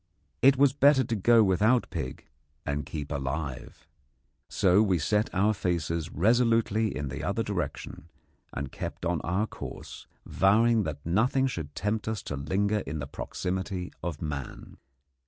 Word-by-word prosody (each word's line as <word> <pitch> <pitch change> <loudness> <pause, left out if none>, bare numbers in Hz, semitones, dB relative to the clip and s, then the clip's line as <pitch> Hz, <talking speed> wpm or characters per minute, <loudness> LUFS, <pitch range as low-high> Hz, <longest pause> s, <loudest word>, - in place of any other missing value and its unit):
It 135 +1 +6
was 140 -1 +4
better 140 -1 +5
to 115 -1 -2
go 115 +3 +5
without 105 +6 +3
pig 65 -7 -5 0.4
and 70 -1 -2
keep 75 -2 -6
alive. 70 -1 -5 0.6
So 95 +2 +4
we 95 -4 +2
set 105 +7 +1
our 100 +3 +2
faces 85 -3 -2
resolutely 115 +2 +2
in 70 -2 -3
the - - -5
other - - -1
direction, 80 - -5 0.4
and 70 -1 -5
kept - - -6
on 85 -2 0
our 95 +5 0
course, - - -9 0.2
vowing 110 +2 +3
that 75 -2 -6
nothing 115 +10 +2
should 80 - -4
tempt 105 +2 -2
us 110 -1 -3
to 75 - -4
linger 100 +9 0
in 80 -5 -5
the 70 - -4
proximity 90 +5 -4
of 85 -2 -4
man. 70 -4 -6
95 Hz, 150 wpm, -28 LUFS, 75-110 Hz, 0.6 s, It